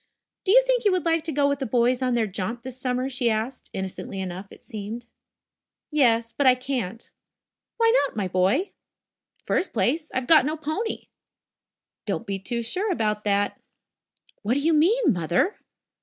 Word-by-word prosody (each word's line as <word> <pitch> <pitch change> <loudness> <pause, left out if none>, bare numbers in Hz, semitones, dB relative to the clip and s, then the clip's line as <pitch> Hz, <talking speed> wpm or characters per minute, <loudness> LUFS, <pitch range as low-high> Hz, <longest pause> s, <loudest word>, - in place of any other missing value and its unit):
"Do 380 - +3
you - - +7
think - - +2
you 410 - +4
would 365 -3 0
like 330 -1 +2
to 325 - -2
go 285 -1 +2
with 280 -1 0
the 270 - -2
boys 245 +2 +2
on 255 -1 +1
their 230 -2 +2
jaunt 210 +4 -4
this 255 0 -9
summer?" 255 -1 -1
she 250 -2 0
asked, 225 +4 -3
innocently 190 +1 -5
enough, 190 +1 -5
it - - -15
seemed. 220 0 -6 0.9
"Yes, 235 -6 +3
but 285 - +2
I 255 - +7
can't." 250 -5 -4 0.7
"Why 455 0 +4
not, - - -15
my 205 -3 -1
boy?" 190 - +1 0.7
"First 370 - 0
place, 255 - 0
I've 260 -1 -2
got 315 +1 +7
no 305 +3 -2
pony." 315 +9 -3 1.0
"Don't 235 - -2
be 195 -2 -3
too 235 +4 -3
sure 380 - 0
about 210 -8 0
that." 205 0 +1 0.8
"What 230 +4 0
do 285 - +1
you 325 +3 +3
mean, 345 - +4
Mother!" 175 - 0
250 Hz, 175 wpm, -25 LUFS, 215-310 Hz, 1.0 s, you